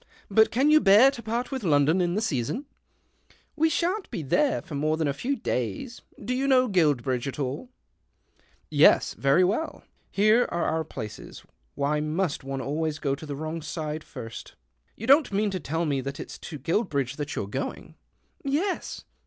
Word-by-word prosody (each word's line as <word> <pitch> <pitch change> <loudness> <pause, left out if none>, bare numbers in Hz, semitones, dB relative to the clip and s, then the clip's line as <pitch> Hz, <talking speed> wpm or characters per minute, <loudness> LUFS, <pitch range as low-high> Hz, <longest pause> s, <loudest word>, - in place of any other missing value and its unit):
" - - -26
But 220 +2 +5
can 270 +6 +3
'■ou 310 0 +6
bear 215 +7 +7
to 245 - -8
part 235 +3 -3
with 265 -4 -3
Loudon 155 +1 +3
in 175 0 0
the 215 - 0
leason? 135 - -2 0.4
" - - -34
"We 320 +1 +3
shan't 360 +5 -1
be 165 - -4
there 280 - +2
for 175 - -10
more 155 +2 0
than 160 -2 0
a 140 - 0
few 255 - -2
lays. 125 - -3 0.2
Do 235 +4 -3
you 265 +2 0
know 255 -2 +4
Guilbridge 145 - +1
at 135 - -5
all? 140 - -4 0.3
" - - -45
" - - -37 0.2
Yes; - - +2
very 140 +6 +3
well. 220 - -1 0.3
(Here 215 +4 +4
are 170 - -1
our 160 0 0
places 110 -8 -8 0.2
— 60 - -42
vhy 150 +1 0
must 155 0 -1
one 135 0 -4
always 155 +3 -2
go 140 -3 -1
to 150 +3 -7
the 145 - -4
wrong 155 +3 -4
side 155 0 -4
irst 115 -6 -9 0.2
?) - - -43
You 225 - -6
don't 275 +2 +5
mean 205 +1 +1
to 185 - -3
tell 165 +2 -2
me 140 -3 0
that 140 +2 -6
it's - - -8
to 150 - -7
jruilbridge 140 - -1
that 145 -1 -4
you're - - -2
going? 130 +7 -5 0.2
" - - -45
" - - -36
Y 275 -1 -2
yes." 370 +6 -2
160 Hz, 210 wpm, -26 LUFS, 140-235 Hz, 0.4 s, bear